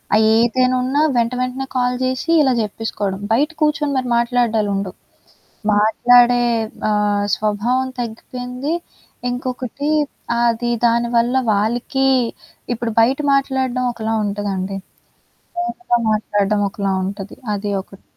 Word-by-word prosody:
ఆహ్, 220 - +5
ఏదైనా 255 +2 +3
ఉన్నా 275 +4 +1 0.2
వెంట 235 +1 +2
వెంటనే 255 +1 -3
కాల్ 250 0 +1
చేసి 260 +5 -2
ఇలా 265 -3 +3
చెప్పేసుకోవడం. 205 -2 -3
బయట 290 +7 +2
కూర్చొని 300 -1 +1
మీరు 255 -1 -1
మాట్లాడ్డాలుండవు. 220 -5 0 0.8
మాట్లాడే 240 +3 +5 0.5
ఆహ్, 205 -1 +1
స్వభావం 225 +5 0
తగ్గిపోయింది. 250 +5 -4 0.6
ఇంకొకటి 255 +3 -3 0.5
అది 240 0 +1 0.2
దానివల్ల 235 +1 +2 0.2
వాళ్ళకి 240 +6 0 0.7
ఇప్పుడు 230 -1 -3
బయట 260 +5 +2 0.2
మాట్లాడడం 260 -2 0
ఒకలా 225 -1 -3
ఉంటదండి. 200 -1 -3 0.8
ఫోనులో 355 -7 -1
మాట్లాడడం 205 -1 0
ఒకలా 195 -1 -1
ఉంటది. 195 +1 -6 0.2
అది 205 0 -3
ఒకటి. 195 0 -17
240 Hz, 105 wpm, -19 LUFS, 210-255 Hz, 0.8 s, ఆహ్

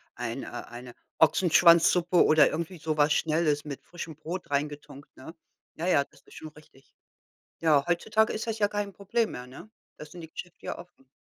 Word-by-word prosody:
ein - - -5
äh, - - -7
eine 120 +1 -9 0.2
Ochsenschwanzsuppe 170 +2 +5
oder 155 -1 +5
irgendwie 170 +3 -4
so 155 0 -3
was 145 0 +3
Schnelles 155 -1 +1
mit 140 -2 -7
frischem 165 -3 -8
Brot 170 +3 -7
reingetunkt, 145 0 -4
ne? 160 +6 -11 0.4
Ja, 170 +3 -4
ja, 140 -6 +3
das - - -24
ist - - -20
schon 155 - -8
richtig. 150 -3 -21 0.7
Ja, 150 -4 +3
heutzutage 215 +6 +1
ist 220 +2 -5
das 225 - -2
ja 205 - +3
kein 205 -1 -4
Problem 220 +4 -1
mehr, 125 0 -8
ne? 170 +12 -13 0.3
Das 150 0 -11
sind 175 - -10
die 160 - -11
Geschäfte 180 0 -10
ja - - -4
offen. 155 -7 -16
160 Hz, 185 wpm, -27 LUFS, 150-180 Hz, 0.7 s, Ochsenschwanzsuppe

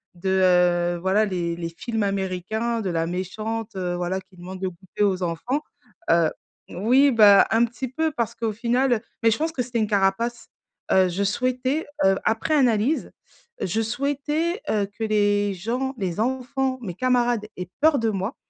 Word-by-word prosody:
de, 190 +2 -3
heu, 180 -2 +3
voilà, 195 +4 +2
les 175 -3 -2
les 170 -1 -4
films 220 +6 -4
américains, 200 +4 -2
de 190 - -2
la 165 -1 0
méchante, 215 +5 -4
heu, 180 -1 -2
voilà, 180 +2 -2
qui 185 0 -19
demande 185 +2 -9
le 185 - -1
goûter 190 +4 -4
aux 190 -2 +1
enfants, 240 - -2 0.5
heu 170 -2 +4 0.4
oui, 260 +8 +3
bah, 210 -4 +7
un 225 +1 +4
petit 245 +3 -5
peu 320 +4 -1
parce 235 -3 -2
qu'au 225 -2 -2
final 240 +1 +1 0.2
mais 225 - +5
je - - +1
pense 320 +2 -1
que 265 - -2
c'était 235 -1 -3
une 215 - +1
carapace. 205 +4 0 0.4
Heu, 185 -1 +4
je 195 +3 -1
souhaitais, 255 +8 -1 0.2
heu, 195 0 +5
après 225 +8 +1
analyse, 250 +2 +2 0.5
je 220 +5 0
souhaitais, 285 - -1
heu, 205 -2 +1
que 210 +2 -8
les 205 -1 +2
gens, 250 +8 -3
les 190 -4 -3
enfants, 260 +2 -1
mes 185 -6 -5
camarades 240 -2 +1
aient 180 -1 -6
peur 310 -2 +5
de 225 -1 +1
moi 195 +4 -3
215 Hz, 175 wpm, -24 LUFS, 185-245 Hz, 0.5 s, bah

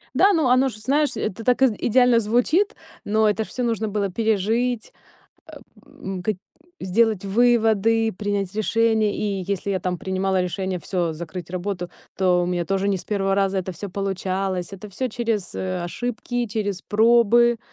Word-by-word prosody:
Да, 400 +1 +5
ну 315 -8 +2
оно 255 +2 +4
же, 215 - -10
знаешь, 285 +6 +1
это 220 +2 -4
так 250 +2 +2
и - - +8 0.2
идеально 245 0 +5
звучит, 245 - +1 0.3
но 215 +1 +3
это 215 +1 0
всё 250 +3 -5
ж - - +1
нужно 225 -1 -1
было 205 -1 -1
пережить, 225 +3 0 0.5
э, - - -14 0.3
м, 190 -1 -7
как 215 +3 0 0.5
сделать 215 +1 +1
выводы, 225 0 +3
принять 200 -1 -3
решение, 220 -1 +2
и 200 -2 -2
если 200 +1 -3
я 190 -2 -1
там 180 -1 -2
принимала 190 +1 0
решение 185 +1 -3
всё, 170 0 -2
закрыть 170 +2 -7
работу, 180 -1 -4 0.3
то 180 -2 +3
у - - -3
меня 175 -1 -1
тоже 195 +2 0
не 200 - +1
с - - -11
1 195 -2 0
раза 195 -1 +1
это 185 0 -4
всё 200 +4 -7
получалось. 190 -1 -2
Это 195 +2 -9
всё 255 +6 -3
через, 225 -4 -2
э, 185 -1 -3
ошибки, 245 +5 -3
через 205 -3 -3
пробы. 235 +2 +4
205 Hz, 175 wpm, -23 LUFS, 190-230 Hz, 0.5 s, и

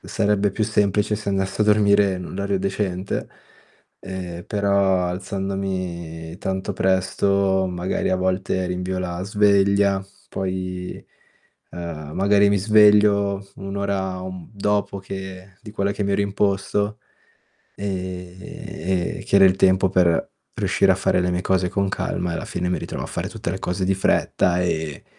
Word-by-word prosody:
sarebbe 105 -2 +1
più 110 - -2
semplice 105 -1 +1
se 105 -1 -6
andassi 95 +1 -1
a - - +5
dormire 105 -1 +4
in 90 0 -5
un - - -8
orario 100 0 -1
decente, 95 -1 -2 0.7
ehm, 90 -2 -6
però 100 -3 +2
alzandomi 90 -3 -4
tanto 95 +2 -2
presto, 95 +1 +2
magari 90 +1 -1
a 95 - +2
volte 95 0 0
rinvio 90 +1 -2
la 90 -1 -3
sveglia, 100 -1 +3 0.3
poi, 90 -1 -4 0.7
ehm, 80 -4 -6
magari 100 +1 +4
mi 100 0 +3
sveglio 105 -1 +4
1 95 0 -6
ora, 95 -2 -2
un 95 -2 -7
dopo 100 -1 -1
che 95 0 -8
di 105 -3 -10
quella 100 -1 0
che 100 0 -2
mi 100 - 0
ero 100 - +2
imposto, 100 +1 0 0.8
ehm, 90 -2 -4
che - - +2
era 100 - +8
il 95 0 +3
tempo 95 0 +4
per 90 -3 +2 0.3
riuscire - - +3
a - - 0
fare - - +1
le 90 0 +1
mie 90 0 0
cose 95 -1 +1
con 100 +1 0
calma, 90 -2 -2
e - - -2
alla - - -4
fine 90 0 -2
mi 90 - +1
ritrovo - - -5
a - - -4
fare - - -4
tutte - - -4
le 95 - -3
cose 90 0 -2
di 95 +1 +2
fretta 90 -1 +2
e 80 -4 -2
95 Hz, 155 wpm, -22 LUFS, 90-100 Hz, 0.8 s, era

